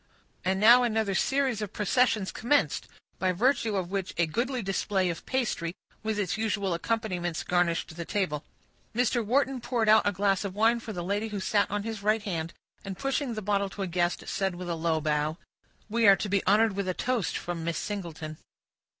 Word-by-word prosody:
And 190 +1 +1
now 235 +4 +8
another 220 -4 +1
series 265 +1 +1
of 210 - -5
processions 215 -1 +2
commenced, 285 +6 +1 0.3
by 185 -1 +2
virtue 230 +1 +2
of 185 -2 -2
which 195 -2 -3
a 170 - +3
goodly 240 - -2
display 190 -1 0
of 165 - -9
pastry, 215 -10 -1 0.3
with 220 -1 -2
its 205 0 -1
usual 200 -4 0
accompaniments, 175 -3 -2
garnished 170 -2 0
the 170 - -4
table. 165 -6 -1 0.5
Mr. 240 0 +2
Wharton 265 +3 +1
poured 240 -2 0
out 215 -1 +6
a - - +3
glass 195 0 +1
of 195 -2 -5
wine 225 +3 +3
for 230 - -7
the 175 -4 -4
lady 205 +4 -1
who 210 -2 -4
sat 200 +1 +1
on 205 0 -2
his 220 -2 -5
right 215 +1 +1
hand, 170 -5 -3 0.3
and, 195 -1 -6
pushing 275 -1 -1
the 215 - -4
bottle 200 0 +1
to 195 +1 -5
a - - 0
guest, 175 0 0
said 190 -2 -1
with 175 0 -6
a - - +1
low 160 -1 0
bow,— 150 +1 0 0.5
"We 230 0 +2
are 200 - +9
to 205 - -4
be 200 0 +1
honored 210 +1 +4
with 200 -1 -2
a 185 - -1
toast 245 -8 -1
from 175 -2 -4
Miss 170 0 -2
Singleton." 165 -6 -5
200 Hz, 200 wpm, -28 LUFS, 180-225 Hz, 0.5 s, are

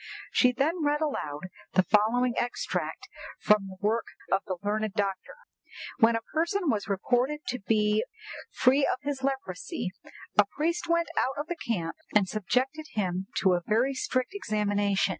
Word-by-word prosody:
She 250 - +5
then 305 +7 0
read 295 0 +2
aloud 155 - -2 0.3
the 185 - +5
following 230 +5 +3
extract 245 0 -2 0.3
from 210 -2 +3
the 190 - -9
work 220 +3 +1 0.3
of 195 - +3
the 185 - -2
learned 215 0 -1
doctor: 200 - -2 0.6
"'When 230 +1 +5
a 225 - -2
person 340 +2 +1
was 210 -2 -2
reported 245 +9 +1
to 250 - -2
be 210 +1 +2 0.5
free 265 +2 +3
of - - +2
his 280 -1 -2
leprosy, 265 - -3 0.5
a 205 - +8
priest 335 +4 0
went 335 0 +2
out 265 - 0
of 295 - -2
the 345 - -3
camp 175 - -3 0.2
and 205 -2 +5
subjected 255 +10 -1
him 190 -2 -1
to 190 -1 +4
a 175 - +1
very 240 +6 +2
strict 255 +3 -1
examination. 205 - +1
230 Hz, 160 wpm, -28 LUFS, 205-280 Hz, 0.6 s, a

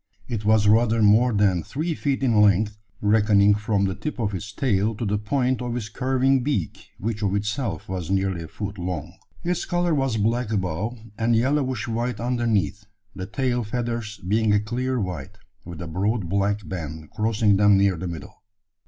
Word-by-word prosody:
It 115 -4 -3
was 110 -1 +4
rather 115 +1 +4
more 110 +4 +5
than 100 -5 +2
three 155 - -3
feet 140 -3 -1
in 115 -5 +4
length 105 +1 +3 0.3
reckoning 105 -1 +4
from 105 -1 0
the 95 - -1
tip 150 +9 -5
of 105 -4 -1
its 100 +3 -5
tail 110 -3 0
to 115 - -4
the 105 0 0
point 130 +3 0
of 120 -1 -2
its 105 -3 -5
curving 130 +2 +1
beak, 125 - -3
which 110 +1 -3
of 100 -1 +1
itself 105 +2 -2
was 90 -3 -4
nearly 95 -2 0
a 80 - -7
foot 100 +3 -6
long! 85 -2 -4 0.3
Its 175 0 -1
colour 175 -1 +1
was 135 -5 0
black 115 +2 0
above, 100 +4 -2 0.2
and 115 +1 +2
yellowish 130 -1 0
white 120 +2 -2
underneath, 115 -5 0 0.3
the 95 0 -5
tail 125 +1 -1
feathers 115 -1 -3
being 110 +2 +2
a 105 - +4
clear 125 +4 -2
white, 90 -9 -5 0.3
with 85 -1 -8
a - - -6
broad 100 +4 -1
black 100 +2 0
band 80 -3 -6
crossing 110 -2 +2
them 105 -1 +5
near 100 -1 +3
the 90 +2 -5
middle. 85 -4 -8
105 Hz, 180 wpm, -24 LUFS, 100-120 Hz, 0.3 s, more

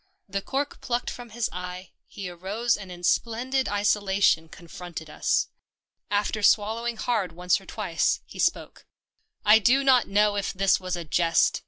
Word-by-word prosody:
The 195 0 -3
cork 280 +6 -3
plucked 245 -2 -2
from 245 -2 -9
his 230 +1 -2
eye, 180 0 -7 0.2
he 200 -3 -7
arose 195 +7 -1
and 195 -3 -9
in 175 0 -10
splendid 250 +7 0
isola 205 -1 +1
tion 165 -5 +3
confronted 170 -2 -9
us. - - 0 0.6
After 205 +1 0
swallowing 225 +3 +2
hard 215 -7 -1
once 180 +3 +1
or 195 - -18
twice, 190 -7 0
he - - -12
spoke. - - -1 0.3
" 440 -1 -41
I 210 +1 +7
do 260 +5 +3
not 260 -3 +4
know 205 +1 +2
if 200 - -2
this 195 0 +3
was 185 -1 -3
a 170 -1 -6
jest." 165 +2 +2
205 Hz, 170 wpm, -26 LUFS, 180-235 Hz, 0.6 s, I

